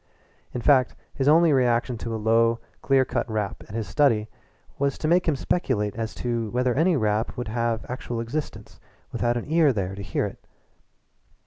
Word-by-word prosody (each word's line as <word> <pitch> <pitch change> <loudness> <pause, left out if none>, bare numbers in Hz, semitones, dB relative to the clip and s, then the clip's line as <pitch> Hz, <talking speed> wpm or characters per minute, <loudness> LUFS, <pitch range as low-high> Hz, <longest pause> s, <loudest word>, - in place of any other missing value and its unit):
In 125 - -4
fact, 130 -1 +3 0.2
his 135 - -1
only 160 +1 +6
reaction 125 -1 +2
to 115 0 -4
a - - -2
low, 115 +1 +3 0.2
clear 135 -1 +3
cut 120 -1 -2
rap 105 -3 -3
at 105 - -7
his 110 -3 -3
study 110 +1 +2 0.5
was 140 -1 0
to 155 - -2
make 175 +2 +3
him 160 - +2
speculate 125 - -1
as 115 0 -4
to 120 -3 -2
whether 125 +2 +1
any 165 +4 +2
rap 110 -1 0
would 120 -3 -4
have 115 0 -1
actual 120 -2 -4
existence 115 -3 -5 0.3
without 120 0 0
an 120 - -4
ear 160 -1 +4
there 95 -5 -2
to 100 - -7
hear 100 - -1
it. - - -8
120 Hz, 185 wpm, -25 LUFS, 110-135 Hz, 0.5 s, only